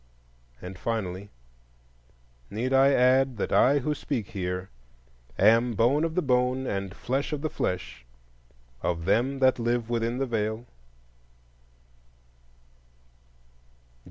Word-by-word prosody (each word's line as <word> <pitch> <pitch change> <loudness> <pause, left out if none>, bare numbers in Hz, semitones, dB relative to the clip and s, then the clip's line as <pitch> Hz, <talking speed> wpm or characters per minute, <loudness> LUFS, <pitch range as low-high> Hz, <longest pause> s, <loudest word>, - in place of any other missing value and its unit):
And, 90 0 -8
finally, 100 -4 -3 1.2
need 125 +5 -2
I 135 +1 +5
add 130 -1 +3
that - - -2
I 140 +3 +5
who 150 +2 -1
speak 135 -7 -4
here 90 -1 -4 0.7
am 115 +4 +4
bone 125 +9 +3
of 165 -1 -2
the 180 - +1
bone 125 0 +1
and 100 -4 -3
flesh 135 +5 -2
of 150 -2 -3
the 155 - -2
flesh 90 -8 -3 0.8
of 85 -1 -2
them 120 +8 +1
that 130 -2 +3
live 120 0 -1
within 115 +1 -1
the 135 - 0
Veil? 110 -1 -2
120 Hz, 115 wpm, -27 LUFS, 100-135 Hz, 1.2 s, I